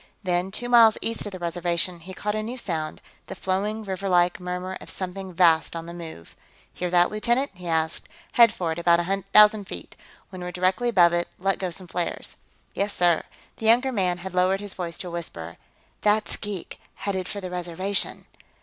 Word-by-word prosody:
Then, 180 0 0
two 230 +5 -3
miles 230 -3 +7
east 225 -2 -2
of - - -6
the 185 - -6
Reservation, 175 0 -1
he 185 +3 -10
caught 210 +1 -2
a 215 - -1
new 235 +4 -5
sound 160 -9 -3 0.2
the 190 - -6
flowing, 200 +4 -1
riverlike, 185 -3 +1
murmur 180 +1 -4
of - - -10
something 190 0 -5
vast 170 -2 +4
on 165 0 -5
the 170 - -8
move. 160 - -10 0.4
"Hear 180 - -3
that, 175 0 +4
lieutenant?" 240 +6 +1
he 180 -2 -10
asked. 160 -1 -1 0.2
"Head 235 -2 +7
for 180 -7 -2
it, 160 - -3
at - - -3
about 170 0 +5
a 195 +3 -1
thousand 210 -1 +7
feet. 90 - -8 0.4
When 185 -1 -8
we're 180 0 -4
directly 185 +6 +1
above 175 -6 +5
it, 175 0 0
let 195 +1 0
go 185 - -1
some 185 +2 -4
flares." 175 0 -3 0.4
"Yes, 200 +1 -1
sir." 175 -2 +3 0.4
The 220 - -2
younger 245 +4 +5
man 185 -6 0
had 185 +1 -7
lowered 185 +1 +3
his 205 -1 -6
voice 170 -3 -5
to 185 - -5
a - - -6
whisper. 85 - -6 0.4
"That's 210 +1 +2
geek, 205 -5 -5 0.2
headed 190 -2 -3
for 205 - -3
the 185 -2 -6
Reservation." 180 +3 -2
185 Hz, 200 wpm, -25 LUFS, 175-205 Hz, 0.4 s, miles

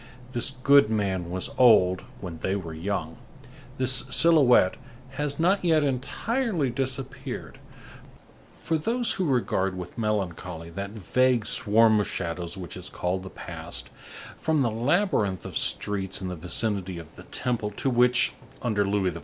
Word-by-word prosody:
This 120 +2 +1
good 135 -2 +4
man 95 -5 -1
was 90 +1 -2
old 95 -7 +6 0.2
when 85 -4 -7
they 95 - -1
were 85 -5 -5
young. 80 -1 -3 0.6
This 130 0 +2
silhouette 135 - +5 0.3
has 145 +2 -3
not 185 +4 +3
yet 160 -3 +3
entirely 155 - -1
disappeared—for 130 +1 -4 1.2
those 235 +7 -1
who 185 - -1
regard 95 - 0
with 90 +5 -7
melancholy 90 -6 -3
that 100 +3 -5
vague 115 +3 +1
swarm 110 +1 +4
of 105 - 0
shadows 85 +1 -4
which 90 -5 -7
is - - -7
called 90 +1 -2
the 95 - -8
past—from 155 +8 -5
the 120 - +1
labyrinth 115 - +1
of - - -7
streets 95 -2 -1
in 95 - -4
the 90 - -4
vicinity 95 +2 -2
of 80 -1 -11
the - - -12
Temple 120 -4 -2
to 120 +6 -2
which, 125 0 +3 0.3
under 110 -4 +1
Louis 100 -2 +1
XIV. 85 - -7
110 Hz, 145 wpm, -26 LUFS, 95-130 Hz, 1.2 s, old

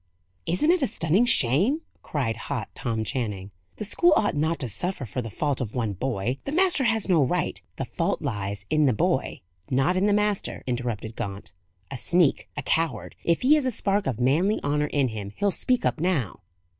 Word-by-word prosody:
"Isn't 185 - +3
it 360 -2 +2
a 270 - +2
stunning 190 +1 +2
shame?" 190 - +4 0.2
cried 130 -7 -2
hot - - -4
Tom 115 -2 -2
Channing. 105 -5 -3 0.2
"The - - -5
school 345 - +4
ought 205 - +1
not 160 +3 +1
to 130 - -1
suffer 175 - -2
for 125 +4 -4
the 115 - -6
fault 140 +5 -1
of 110 -4 -4
one 115 -5 -1
boy. 125 +3 -2
The 275 - -3
master 345 -4 +3
has 225 -2 +1
no 170 -6 +4
right 130 - -1
" - - -44
"The - - -2
fault - - -1
lies 100 -1 -4
in 155 -1 +4
the 130 - +3
boy, 105 - 0 0.3
not 135 +7 +2
in 190 +2 +2
the - - +3
master," 210 -1 0
interrupted 120 -3 -3
Gaunt. 100 -3 -5 0.4
"A 135 - -4
sneak! 170 +3 +2
a 145 - -3
coward! 165 +3 -1
If 170 -1 +1
he 265 +4 +5
has 300 -4 +3
a - - +1
spark 200 -2 +1
of 125 -4 -2
manly 160 - +2
honour 150 +1 +1
in 140 -3 +1
him, 105 -2 -6
he'll 200 -1 +1
speak 250 +5 0
up - - 0
now." 155 - 0
145 Hz, 205 wpm, -25 LUFS, -, 0.4 s, he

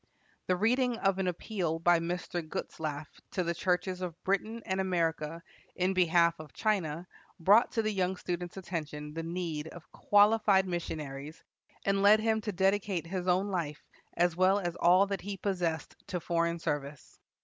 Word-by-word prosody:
The 185 - +3
reading 245 +4 +2
of 195 -2 +1
an 190 - 0
appeal 180 -2 -2
by 170 +1 +4
Mr. 175 +1 -3
Gutzlaff 155 -1 -5 0.3
to 185 - 0
the 170 0 -1
churches 180 +1 -1
of 175 -2 -5
Britain 215 +4 -1
and 190 0 0
America 165 -3 -1 0.3
in 185 +1 +1
behalf 170 -2 +3
of 155 -2 -11
China 180 -6 -1 0.3
brought 205 +8 +5
to 225 - +1
the 215 - 0
young 190 -2 0
student's 175 0 -4
attention 150 -5 -5
the 165 - -3
need 165 -2 -4
of 160 -1 -12
qualified 205 -2 +4
missionaries, 155 -4 -5 0.4
and 195 0 +2
led 205 +2 +7
him 220 0 +1
to 210 - -3
dedicate 195 -2 +1
his 185 +1 -4
own 185 +3 +2
life 160 -5 -3 0.3
as 175 -1 +2
well 185 +2 +4
as 175 -4 -2
all 180 +3 +5
that 200 -1 -3
he 200 0 -5
possessed 175 -6 -2
to 180 - -2
foreign 170 0 0
service. 145 -3 -5
180 Hz, 165 wpm, -30 LUFS, 165-195 Hz, 0.4 s, led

